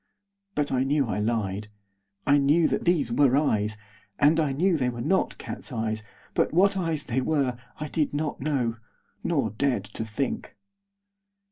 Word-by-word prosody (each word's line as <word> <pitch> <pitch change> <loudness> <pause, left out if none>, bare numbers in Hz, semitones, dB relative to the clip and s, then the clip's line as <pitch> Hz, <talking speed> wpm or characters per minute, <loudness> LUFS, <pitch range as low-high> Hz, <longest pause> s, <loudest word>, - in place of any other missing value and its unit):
But 145 -1 0
I 130 0 +2
knew 140 +1 +2
I - - -1
lied. 105 -2 -1 0.6
I 145 0 +5
knew 150 +4 +4
that - - -1
these 170 -9 +2
were 135 +1 +4
eyes, 110 -7 +1 0.4
and 150 +3 +4
I 150 -3 +2
knew 175 +7 +2
they 130 -5 +1
were 120 -1 -6
not 155 +11 +1
cats' - - -6
eyes, 110 -2 -2 0.3
but - - +2
what 195 +4 +4
eyes 165 -5 -1
they 130 +2 -1
were 135 -3 +1 0.2
I 150 - -3
did 150 0 0
not 150 +1 -2
know, 130 -6 0 0.5
nor 140 - +1
dared 125 -2 0
to 105 +2 -6
think. 135 - -3
140 Hz, 165 wpm, -26 LUFS, 115-155 Hz, 0.6 s, I